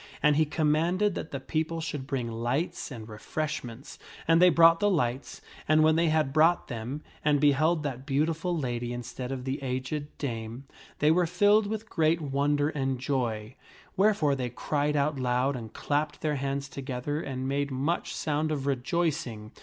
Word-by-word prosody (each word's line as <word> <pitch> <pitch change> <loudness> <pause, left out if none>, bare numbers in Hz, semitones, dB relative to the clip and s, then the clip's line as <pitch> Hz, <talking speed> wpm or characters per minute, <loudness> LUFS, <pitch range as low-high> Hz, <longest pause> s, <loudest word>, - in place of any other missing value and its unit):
And 150 0 +5
he 155 +1 +4
commanded 165 +6 +1
that 160 - -5
the 140 - -4
people 160 +4 -2
should 150 -4 -4
bring 125 -5 -2
lights 120 +9 -2
and 115 -6 -8
refreshments, 130 +2 -5 0.3
and 165 +1 +5
they 180 - +8
brought 165 -1 +6
the 205 0 +3
lights, 130 -7 -1 0.3
and 155 0 +5
when 155 0 +5
they 165 +1 +3
had 155 -4 +1
brought 160 +3 +3
them 125 +5 -5 0.2
and 150 -1 +3
beheld 155 +3 +3
that 130 -3 -4
beautiful 160 +5 0
lady 120 -4 -2
instead 120 +1 -6
of 130 -2 -4
the 135 +2 -3
aged 130 +3 -3
dame, 115 -2 -5 0.3
they 150 +1 +4
were 175 +1 +3
filled 205 +4 +4
with 220 +1 -4
great 165 -3 +2
wonder 145 0 +1
and 135 -4 -2
joy; 120 -5 -2 0.4
wherefore 195 -7 +3
they 130 -2 -2
cried 145 +4 -1
out 145 0 +1
aloud 130 +2 +1
and 115 -3 -7
clapped 150 +1 -2
their 150 -2 0
hands 140 0 -2
together 140 +2 -4
and 130 -3 -4
made 140 +1 0
much 140 +6 -2
sound 155 0 -1
of 140 -3 -2
rejoicing. 135 -4 -1
145 Hz, 170 wpm, -28 LUFS, 130-160 Hz, 0.4 s, they